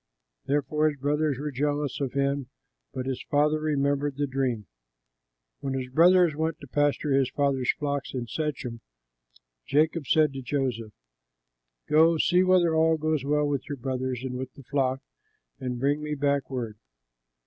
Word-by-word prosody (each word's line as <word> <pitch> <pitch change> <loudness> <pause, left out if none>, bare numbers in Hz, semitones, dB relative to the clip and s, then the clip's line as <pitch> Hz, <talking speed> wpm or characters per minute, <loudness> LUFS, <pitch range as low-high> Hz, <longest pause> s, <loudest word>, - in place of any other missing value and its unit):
Therefore 145 +2 +1
his 145 - -7
brothers 145 0 0
were 150 +2 -4
jealous 145 +1 -1
of 135 -3 -2
him; 140 -1 0 0.4
but 130 - -4
his 130 -1 -3
father 150 +1 +3
remembered 145 -2 0
the 145 - +1
dream. 130 -5 -1 0.9
When 135 -1 -3
his 130 -1 -3
brothers 175 +3 +5
went 160 +1 -2
to 140 - -10
pasture 145 +2 +1
his 135 -1 +3
father's 135 -3 +1
flocks 140 -2 -3
in 125 -2 -2
Shechem, 125 -4 -4 0.9
Jacob 155 0 +1
said 155 0 +3
to 135 - -5
Joseph, 125 -5 -2 0.9
"Go, 160 +2 +5
see 180 +3 +3
whether 180 -3 +4
all 160 0 +3
goes 155 -2 0
well 150 +1 +1
with 140 -2 -2
your 145 - -3
brothers 130 0 -3
and 125 -1 -4
with 130 0 -5
the 140 - -13
flock, 135 0 0 0.6
and 125 -2 -4
bring 145 +3 +1
me 150 0 -3
back 140 -1 0
word." 115 -5 -4
140 Hz, 160 wpm, -27 LUFS, 130-150 Hz, 0.9 s, brothers